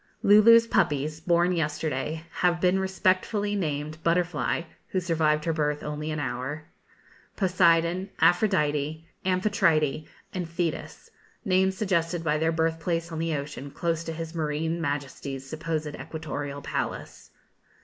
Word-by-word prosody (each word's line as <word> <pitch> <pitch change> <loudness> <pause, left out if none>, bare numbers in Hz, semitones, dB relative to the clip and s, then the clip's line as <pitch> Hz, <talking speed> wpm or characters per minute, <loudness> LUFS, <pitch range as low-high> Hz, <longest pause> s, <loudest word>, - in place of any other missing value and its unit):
Lulu's 230 +3 +7
puppies, 155 -8 +1
born 170 +2 +2
yesterday, 155 -1 -2
have 175 -1 +2
been 185 +1 +3
respectively 190 +2 +1
named 155 -3 -3
Butterfly 170 -1 +1 0.2
(who 190 - -1
survived 155 -3 +1
her 165 - +1
birth 150 -1 -1
only 150 +1 -4
an 155 -1 -2
hour), 130 +3 -3 0.7
Poseidon, 180 -1 +3
Aphrodite, 155 -5 +2 0.2
Amphitrite, 185 -6 +1 0.3
and 180 -3 -3
Thetis 170 -1 -4 0.3
names 190 -1 +2
suggested 170 -4 0
by 155 -1 +1
their 160 +1 +2
birth 165 0 0
place 165 0 -2
on 160 - -4
the 165 -1 0
ocean 140 -1 -5
close 165 +2 -2
to 165 - -3
his 165 0 -6
Marine 160 +1 -1
Majesty's 140 -2 -4
supposed 155 +1 -3
equatorial 145 -3 -5
palace. - - -4
165 Hz, 130 wpm, -27 LUFS, 150-180 Hz, 0.7 s, Lulu's